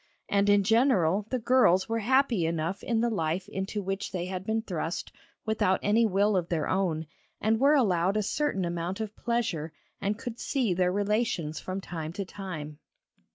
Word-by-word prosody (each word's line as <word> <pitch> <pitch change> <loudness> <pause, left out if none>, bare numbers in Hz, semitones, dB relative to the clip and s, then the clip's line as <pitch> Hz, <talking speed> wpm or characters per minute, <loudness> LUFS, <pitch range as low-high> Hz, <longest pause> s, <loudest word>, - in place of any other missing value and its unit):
And 200 0 +2
in 205 0 +5
general 210 - +3
the 255 - 0
girls 235 -7 +4
were 225 0 -1
happy 235 -6 +2
enough 165 +3 -2
in 230 -2 0
the 235 - +2
life 170 -1 -1
into 195 +2 -4
which 195 +1 -3
they 180 -2 -3
had 185 0 -4
been 220 0 0
thrust 175 -3 -4 0.3
without 215 -4 +2
any 220 +2 +4
will 200 +1 +2
of 175 -2 0
their 165 -3 0
own, 175 -4 0 0.3
and 220 +1 +1
were 280 +3 +5
allowed 195 - +2
a 215 - +1
certain 200 -5 0
amount 175 +3 -3
of 215 -1 -4
pleasure 215 -10 -1 0.3
and 205 +1 -1
could 240 -1 -6
see 250 -9 0
their 180 0 +2
relations 200 -6 0
from 185 +1 -5
time 160 -3 -6
to 200 +2 -4
time. 155 -7 -7
195 Hz, 180 wpm, -28 LUFS, 175-225 Hz, 0.3 s, in